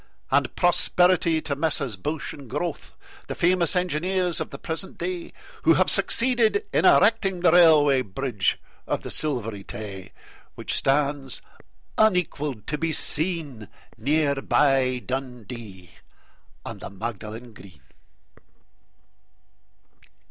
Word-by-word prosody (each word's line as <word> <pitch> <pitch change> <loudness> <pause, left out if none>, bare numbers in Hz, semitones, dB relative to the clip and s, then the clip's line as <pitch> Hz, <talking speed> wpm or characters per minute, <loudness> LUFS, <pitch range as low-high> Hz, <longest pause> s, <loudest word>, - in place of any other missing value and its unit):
And - - +1
prosperity 175 -2 +3
to 140 - -2
Messrs 145 -6 -1
Bouche 150 +12 -4
and 140 -4 -12
Grothe, 150 +4 -4 0.4
The - - -5
famous 175 +1 +2
engineers 180 0 0
of - - -4
the 140 - -8
present 165 +5 -5
day, 175 0 -4 0.3
Who 165 0 +4
have 185 - +3
succeeded 235 - +3
in - - +2
erecting 190 -3 +4
The 175 - +5
Railway 155 -6 +6
Bridge 105 -1 -1 0.3
of - - -2
the - - -7
Silvery 115 -9 -1
Tay, 95 -3 -8 0.4
Which - - -4
stands 140 -2 0 0.6
unequalled 150 - +1
to 150 0 -3
be 165 0 -1
seen 155 - -1 0.3
Near 145 +5 +1
by 130 -4 +2
Dundee 120 -8 -7 0.7
and - - -7
the - - -6
Magdalen 110 +3 -7
Green. 90 -9 -15
145 Hz, 115 wpm, -24 LUFS, 120-175 Hz, 0.7 s, Railway